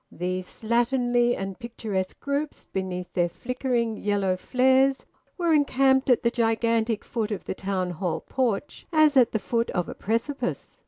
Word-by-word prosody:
These 180 +1 -3
slatternly 240 +1 +1
and 195 -1 -5
picturesque 215 -5 -4
groups, 285 +1 -3
beneath 180 -1 -4
their 175 -1 +1
flickering 240 0 -2
yellow 200 -3 0
flares, 260 +6 +2 0.3
were 340 -3 +2
encamped 270 -2 +3
at 245 - +4
the 235 - +3
gigantic 230 -1 +1
foot 225 -3 -2
of 210 - -4
the - - -3
Town 190 -2 -2
Hall 175 -1 -2
porch 250 -1 -2
as 310 -2 +4
at 255 -3 +5
the - - +1
foot 230 +2 -1
of 180 - -1
a - - -5
precipice. 230 +7 -3
230 Hz, 155 wpm, -26 LUFS, 195-260 Hz, 0.3 s, at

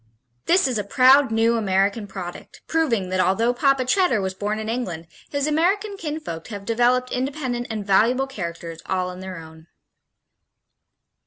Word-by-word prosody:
This 360 -4 +4
is 245 -4 -1
a - - -1
proud 260 +6 +5
new 225 +1 +2
American 200 +1 +1
product, 185 -3 -8
proving 240 - 0
that 185 0 -1
although 225 +6 +2
Papa 270 0 +2
Cheddar 305 - +2
was 190 -1 -2
born 205 +3 -3
in 220 0 -5
England 205 -9 -3 0.2
his 285 -1 -1
American 380 +7 +1
kinfolk 300 - -6
have 205 -3 -7
developed 245 +2 +2
independent 255 -2 -2
and 215 -3 -4
valuable 230 +7 +3
characters 170 -8 -7
all 185 -1 -1
on 180 - -10
their 190 -1 -7
own. 160 0 -13
230 Hz, 155 wpm, -23 LUFS, 190-270 Hz, 0.2 s, proud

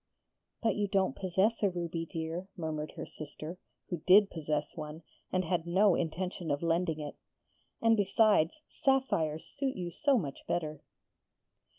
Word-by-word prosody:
'But 225 - +3
you 205 -1 +1
don't 190 -1 +1
possess 190 +4 +1
a 200 - +4
ruby, 170 -2 -3
dear,' 165 +3 -4
murmured 155 -2 -3
her - - -6
sister, 155 +3 -8 0.3
who 175 - 0
did 200 +2 +7
possess 150 -2 -2
one, 155 0 -7 0.3
and 185 -1 +1
had 170 0 0
no 190 +3 +5
intention 175 +1 -2
of 145 +2 0
lending 165 -1 +1
it. 150 -1 -6 0.7
'And, 225 0 +6
besides, 205 - +3
sapphires 170 - +1
suit 270 -1 -3
you 175 -2 -4
so 280 - +3
much 145 - -3
better!' 155 -3 -2
175 Hz, 150 wpm, -32 LUFS, 160-200 Hz, 0.7 s, did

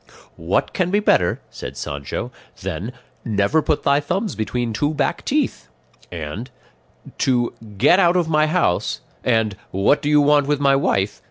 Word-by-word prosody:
"What 85 +3 -1
can 180 -2 0
be 205 +2 +2
better," 90 - +2
said - - -8
Sancho, 70 -1 -5 0.3
"than 95 +5 -4 0.3
'never 110 +8 +1
put 150 - 0
thy 140 +1 +3
thumbs 190 +8 -2
between 115 +1 -2
two 145 +7 0
back 160 +4 -1
teeth;' 275 - -1 0.4
and 85 - -6 0.7
'to 120 -2 +1 0.2
"get 175 - +5
out 175 -2 +4
of 175 -3 +1
my 155 -1 +3
house" 155 - 0 0.2
and 110 -4 +1
"what 100 +10 +2
do 145 - -1
you 150 0 +5
want 145 -1 +4
with 145 -1 +1
my 140 -1 +4
wife?" 100 -7 0
140 Hz, 160 wpm, -21 LUFS, 100-155 Hz, 0.7 s, get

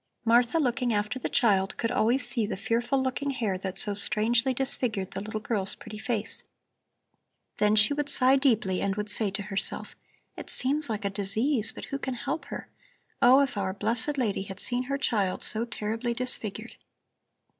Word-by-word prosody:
Martha, 240 +5 +4
looking 250 -4 +1
after 210 +4 -1
the - - -3
child, 195 -4 +2
could 230 - -1
always 245 +2 +2
see 240 -4 0
the 210 - -4
fearful 240 +6 0
looking 265 +2 -2
hair 230 -8 -1
that 190 0 -5
so 205 - +2
strangely 230 +5 +3
disfigured 240 -7 0
the 195 - -4
little 215 +1 -4
girl's 210 -3 -1
pretty 215 - -10
face. 220 -1 -1 1.1
Then 210 0 +3
she 215 +6 +5
would 290 0 -2
sigh 260 -1 +5
deeply 225 -9 +1
and 195 -1 0
would 210 0 -3
say 210 -1 +1
to 200 +1 -4
herself: 195 -1 -3 0.4
It - - -9
seems 285 +2 +1
like 210 -2 -3
a 200 - 0
disease, 215 +5 0
but - - -8
who 275 - -5
can 260 -2 -3
help 285 - -4
her? - - -7 0.5
Oh, 255 +3 +7
if 275 -5 -1
our 190 -1 -1
blessed 230 +8 -1
lady 220 -7 0
had 195 0 -8
seen 250 +3 -1
her 275 +2 -2
child 205 -9 0
so 225 +2 -1
terribly 230 +1 -3
disfigured! 230 -2 -3
230 Hz, 180 wpm, -27 LUFS, 205-255 Hz, 1.1 s, Oh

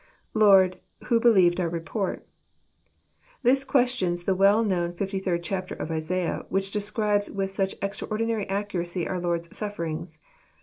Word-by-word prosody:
iLord, 195 -4 +5 0.2
uho.,.helieved 225 -8 +4
our 175 -2 0
report.'] 170 +4 -3 1.2
This 265 +2 +4
question 250 -7 +2
begins 175 0 -3
the 190 - +1
well 200 +4 +4
known 175 -4 0
fifty 195 +2 -3
third 175 -3 -1
chapter 185 +2 -3
of 160 - -5
Isaiah, 165 +2 -2
which 195 0 0
describes 210 0 0
with 195 -1 -3
such 195 0 -1
extraordinary 215 +1 -2
accuracy 185 -3 -2
our 185 - -2
Lord's 170 -1 -2
sufiierings. 170 -6 -5
195 Hz, 135 wpm, -26 LUFS, 175-210 Hz, 1.2 s, iLord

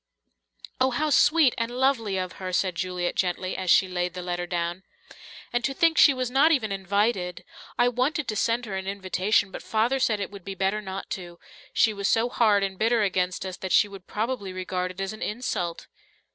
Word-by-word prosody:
"Oh, 260 +1 +4
how 295 +5 -1
sweet 295 -1 +5
and 230 0 -1
lovely 245 -5 +1
of 185 -1 -3
her!" 185 -1 -3
said 185 0 +1
Juliet 180 +1 -2
gently, 185 0 -1
as 185 -1 -3
she 190 - +5
laid 180 0 -2
the 180 - -5
letter 175 0 -3
down. 175 +1 -2 0.7
"And 240 0 0
to 270 - -1
think 330 +2 +3
she 290 - +8
was 255 -2 -2
not 280 +5 +5
even 235 -9 +1
invited! 195 -1 -1 0.3
I 245 - +4
wanted 255 +4 0
to 215 - -2
send 230 +3 0
her 200 -3 -5
an 190 0 -4
invitation, 195 +1 0
but - - -7
Father 230 +5 0
said 220 -4 +1
it 200 - -4
would 200 -3 -11
be 195 +1 -6
better 195 +3 0
not 190 -1 -7
to 175 -2 -6 0.3
she 220 - +3
was 200 -1 -2
so 230 +2 +2
hard 215 -5 +3
and 190 -1 -3
bitter 225 0 +3
against 185 -1 -1
us 185 -1 -5
that 190 - -5
she 210 - +5
would 195 -2 -12
probably 215 -3 -3
regard 185 0 -3
it 185 +1 -10
as 195 +1 -3
an 215 - -11
insult." 200 -7 -3
200 Hz, 210 wpm, -26 LUFS, 185-240 Hz, 0.7 s, she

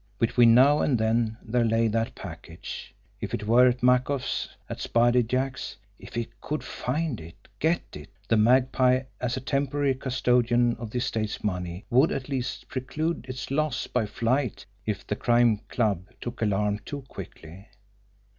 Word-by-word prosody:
Between 115 0 +5
now 140 +4 +6
and 130 - +2
then 110 0 +1
there 120 +1 +1
lay 115 0 +2
that 115 +1 -1
package! 85 -2 -8 0.2
If - - -3
it 105 - -5
were 120 +4 +6
at 125 0 0
Makoff's, 125 +2 +2 0.2
at - - -6
Spider 120 +1 +3
Jack's, 130 +3 -2 0.2
if - - -12
he 115 -1 -1
could 150 +1 -3
find 145 - -2
it, 85 +1 -14
get 165 +2 +2
it 75 - -9 0.2
the 115 - +3
Magpie 130 +3 +4 0.2
as 125 0 -1
a - - -4
temporary 140 +1 0
custodian 125 -2 +2
of 115 -2 -6
the 125 - -4
estate's 110 -3 -2
money 90 -2 -3
would 130 +6 +5
at 130 +1 -4
least 130 -3 -3
preclude 145 +2 -3
its 130 +1 -5
loss 145 -2 0
by 115 -4 -1
flight 115 -1 -1 0.2
if 105 -2 -2
the 105 - -2
Crime 120 -1 +3
Club 100 -6 0
took 120 0 -6
alarm 105 -1 +1
too 140 +7 -7
quickly. 95 - -10
120 Hz, 160 wpm, -27 LUFS, 110-130 Hz, 0.2 s, now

